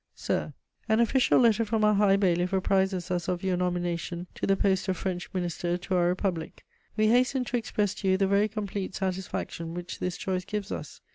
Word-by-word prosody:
_ - - -56 0.2
"SIR, - - -2 0.3
"An 220 +1 +4
official 245 +3 +4
letter 230 -2 +4
from 220 0 0
our 210 0 +5
High 200 -1 +4
Bailiff 180 -1 +1
apprizes 190 -1 +1
us 175 -1 -1
of 180 0 -2
your 190 -1 +1
nomination 175 -1 -2
to - - -3
the 195 0 +3
post 190 0 +1
of 185 -1 0
French 180 -2 -3
Minister 175 -1 -2
to 185 +1 -3
our 175 -1 +3
Republic. 180 -2 -2 0.3
We 215 0 +4
hasten 250 +2 +3
to 245 - -1
express 210 -3 -1
to 200 - -4
you 190 0 +4
the 195 - +2
very 200 +2 +3
complete 205 -3 -4
satisfaction 185 -3 -3
which 175 0 -6
this 180 -1 -2
choice 185 -1 -2
gives 210 +1 -4
us. - - -6
190 Hz, 205 wpm, -28 LUFS, 180-210 Hz, 0.3 s, our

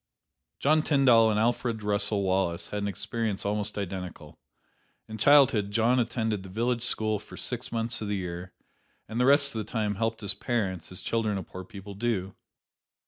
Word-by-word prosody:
John 155 +2 +3
Tyndall 130 -7 +5
and 105 -1 +1
Alfred 115 -1 0
Russel 105 0 +2
Wallace 95 -2 0
had 105 - -3
an 100 - -1
experience 105 0 -3
almost 105 0 -1
identical. 90 -6 -6 0.7
In 110 0 -8
childhood 135 -5 +5
John 115 +4 +2
attended 110 -3 -1
the 95 - -10
village 120 +4 -1
school 110 -3 0
for 105 - -13
six 125 0 -4
months 115 +1 -1
of 105 - -3
the 100 0 -1
year, 90 0 -5 0.6
and 110 +3 -4
the 125 - +3
rest 140 0 +4
of 110 - -3
the 105 - -6
time 105 -3 0
helped 115 +1 -1
his 100 -2 +2
parents, 100 -6 -2
as 90 - -6
children 110 -3 0
of 95 - -5
poor 95 - -8
people 100 +1 -10
do. 100 -3 -2
110 Hz, 180 wpm, -28 LUFS, 100-115 Hz, 0.7 s, Tyndall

